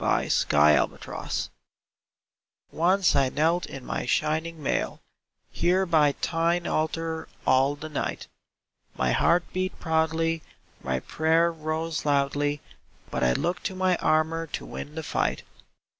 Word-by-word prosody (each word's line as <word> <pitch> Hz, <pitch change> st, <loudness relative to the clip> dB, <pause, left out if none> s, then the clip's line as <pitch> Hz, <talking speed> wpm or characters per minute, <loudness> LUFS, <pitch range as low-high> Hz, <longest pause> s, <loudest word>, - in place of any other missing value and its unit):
Vigils -, -, +2 dB
VIGILS 75 Hz, 0 st, +1 dB, 1.2 s
Once 180 Hz, +3 st, +3 dB
I 135 Hz, -2 st, +3 dB
knelt 165 Hz, +6 st, +1 dB
In 135 Hz, -2 st, -9 dB
my -, -, -3 dB
shining 160 Hz, +3 st, -1 dB
mall -, -, -1 dB, 0.5 s
Here 185 Hz, +2 st, +2 dB
by 155 Hz, -4 st, +3 dB
Thine 170 Hz, +3 st, 0 dB
altar 160 Hz, +1 st, -2 dB, 0.2 s
all 135 Hz, +2 st, +3 dB
the 150 Hz, +2 st, -7 dB
night. 150 Hz, -, -3 dB, 0.7 s
My 65 Hz, -1 st, +1 dB
heart 170 Hz, -, +3 dB
beat 185 Hz, 0 st, -2 dB
proudly, 160 Hz, 0 st, 0 dB, 0.4 s
my 65 Hz, -1 st, -2 dB
prayer 165 Hz, +2 st, +2 dB
rose 160 Hz, 0 st, -3 dB
loudly, 145 Hz, 0 st, +1 dB, 0.5 s
But -, -, -1 dB
I 65 Hz, 0 st, +4 dB
looked 175 Hz, -, -1 dB
to 190 Hz, -, -2 dB
my 185 Hz, -1 st, +2 dB
armor 160 Hz, +1 st, +1 dB
to -, -, -5 dB
win 150 Hz, +1 st, -8 dB
the 160 Hz, -, -4 dB
fight. -, -, -1 dB
160 Hz, 130 wpm, -26 LUFS, 145-165 Hz, 1.2 s, I